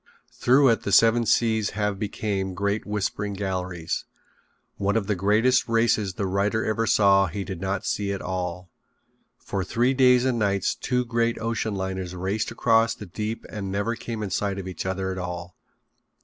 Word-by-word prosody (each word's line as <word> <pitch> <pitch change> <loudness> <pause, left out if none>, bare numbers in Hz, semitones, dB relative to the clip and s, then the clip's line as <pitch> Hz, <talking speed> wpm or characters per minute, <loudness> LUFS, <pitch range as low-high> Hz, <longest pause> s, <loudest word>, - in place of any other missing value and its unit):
Through 130 +2 +4
it 115 - +2
the 100 - -3
seven 115 +3 +5
seas 110 -1 +2
have 105 -2 -1
became 100 -3 -2
great 100 +3 -1
whispering 105 0 -2
galleries. 90 -4 -3 0.7
One 100 +1 0
of 110 -3 +1
the 105 - 0
greatest 105 +7 +2
races 115 -4 +2
the 100 - -2
writer 100 +4 0
ever 110 +1 0
saw 95 -2 +5
he 95 +4 -4
did 95 -3 -6
not 95 0 -2
see 100 -1 -1
at 100 - -3
all. 90 -1 -4 0.7
For 95 - -3
three 120 +7 +1
days 125 -1 +5
and 125 -3 +1
nights 100 -2 +1
two 125 -1 -1
great 115 0 0
ocean 110 -2 -2
liners 95 -1 -4
raced 95 +4 -2
across 115 -1 +2
the 105 - -9
deep 105 +5 -5
and 100 -3 -5
never 100 +4 -1
came 115 -2 -5
in 100 - -4
sight 100 -1 -1
of 95 -1 -5
each 95 0 -5
other 95 0 -2
at 95 - -4
all. 90 0 -6
100 Hz, 175 wpm, -25 LUFS, 95-115 Hz, 0.7 s, seven